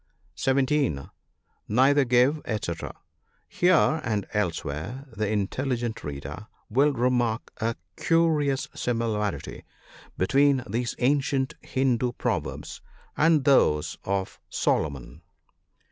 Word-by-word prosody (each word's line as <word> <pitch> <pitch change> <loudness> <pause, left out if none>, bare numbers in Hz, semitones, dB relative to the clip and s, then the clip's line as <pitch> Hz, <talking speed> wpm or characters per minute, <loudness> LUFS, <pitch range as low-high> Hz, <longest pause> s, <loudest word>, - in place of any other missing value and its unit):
(17.) 135 - 0 0.6
Neither 135 +5 +4
give, 125 +5 +3
&c. 105 -6 -2 0.4
— - - -43
Here, 160 -3 +3
and 105 -3 -1
elsewhere, 90 - -3
the 105 -1 -1
intelligent 120 +3 -2
reader 75 +7 -7 0.2
will 140 +6 +4
remark 120 -3 0
a 115 +1 -1 0.2
curious 150 -5 +2
similarity 110 -4 -2 0.5
between 135 +6 +3
these 120 +4 -2
ancient 135 0 +1
Hindoo 125 -2 0
pro 110 -7 0
verbs 75 - -8 0.3
and 160 -2 +4
those 75 - +3
of 95 -1 -2
Solomon. 70 -5 -1
120 Hz, 100 wpm, -26 LUFS, 105-140 Hz, 0.6 s, Neither